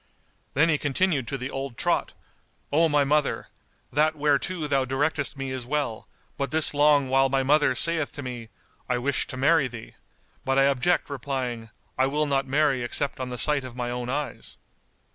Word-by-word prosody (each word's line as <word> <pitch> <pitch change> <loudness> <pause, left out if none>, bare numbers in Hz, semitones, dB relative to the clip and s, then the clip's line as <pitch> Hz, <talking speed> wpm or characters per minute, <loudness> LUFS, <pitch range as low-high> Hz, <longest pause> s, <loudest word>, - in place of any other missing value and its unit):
Then 155 +4 +4
he 155 -3 +2
continued 145 -2 0
to 135 - -3
the 130 +1 -5
old 135 -3 -5
trot, - - 0 0.6
"O 165 +2 +4
my 145 -1 +3
mother, 145 +1 0 0.4
that 155 +3 +2
whereto 150 +3 0
thou 140 -2 +1
directest 140 +2 -1
me 135 -1 -4
is 130 -1 -4
well; 140 -6 -2 0.3
but 140 - -1
this 155 -1 +2
long 145 -1 +4
while 135 +1 +3
my 135 0 +1
mother 145 -1 +3
saith 160 +2 +2
to 145 - -7
me, 120 -3 -7 0.4
'I 125 - +1
wish 135 +3 0
to 130 - -7
marry 145 +1 +3
thee,' 120 -3 -10 0.5
but 135 0 0
I 135 - +5
object 140 +5 +2
replying, 130 -4 -4 0.3
'I 130 - +4
will 150 +2 0
not 140 -1 0
marry 140 -1 +2
except 135 +4 -2
on 130 -1 -4
the 125 - -5
sight 150 +1 +2
of 130 -2 -9
my 120 -1 -3
own 125 0 -4
eyes. 140 -2 -4
140 Hz, 185 wpm, -25 LUFS, 130-150 Hz, 0.6 s, I